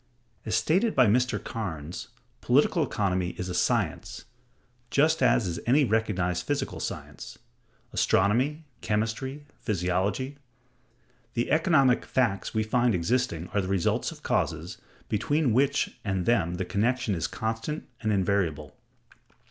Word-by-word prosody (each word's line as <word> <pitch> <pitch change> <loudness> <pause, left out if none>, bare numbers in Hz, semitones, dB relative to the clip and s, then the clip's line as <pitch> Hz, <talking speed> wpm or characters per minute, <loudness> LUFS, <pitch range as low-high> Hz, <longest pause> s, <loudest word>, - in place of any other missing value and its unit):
As 110 - +1
stated 195 +8 +2
by 130 - +6
Mr. 125 +3 +2
Cairnes,(161) 85 -6 -5 0.3
political - - +3
economy 90 -3 -1
is 90 0 -4
a - - -3
science 90 - -1 0.6
just 160 +3 +3
as 115 - +4
is 85 -2 -3
any 140 +4 +5
recognized 100 -6 0
physical 145 -2 -2
science—astronomy, 130 +11 -2 0.2
chemistry, 115 +7 -2
physiology. 100 +7 -1 1.0
The 120 - -1
economic 155 -6 +4
"facts 115 -7 0
we 110 -1 0
find 120 0 +2
existing 90 -2 0
are 100 - 0
the 95 - -4
results 95 -3 0
of - - -13
causes, - - -1 0.3
between 140 +4 +1
which 135 +4 +1
and 95 -4 -1
them 90 -8 +2
the 90 +1 -3
connection 110 +3 0
is 80 -3 -1
constant 115 +8 -4
and 110 -1 0
invariable. 95 -7 0
110 Hz, 125 wpm, -27 LUFS, 95-130 Hz, 1.0 s, by